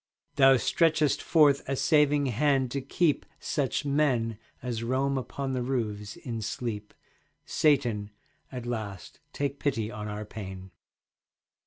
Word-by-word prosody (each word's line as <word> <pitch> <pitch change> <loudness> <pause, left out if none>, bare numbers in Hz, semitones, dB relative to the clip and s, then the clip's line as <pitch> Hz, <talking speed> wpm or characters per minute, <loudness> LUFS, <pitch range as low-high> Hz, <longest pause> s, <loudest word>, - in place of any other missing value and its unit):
Thou 135 -1 +6
stretchest 155 +3 +2
forth 145 -4 +4
a 135 - +1
saving 150 0 +3
hand 130 +1 +1
to 140 - -2
keep 150 +3 +1 0.2
Such 145 0 -1
men 130 -7 +1 0.2
as 120 -3 -3
roam 130 +4 0
upon 135 +2 -3
the 130 - -1
roofs 105 -5 -2
in 115 -2 -5
sleep. 105 -1 -4 0.5
Satan, 120 -9 +2 0.4
at 125 -2 -6
last 110 -6 -5
take 140 0 -3
pity 115 -6 -1
on 105 -2 -6
our 105 0 -5
pain. 95 -3 -8
130 Hz, 130 wpm, -28 LUFS, 110-140 Hz, 0.5 s, Thou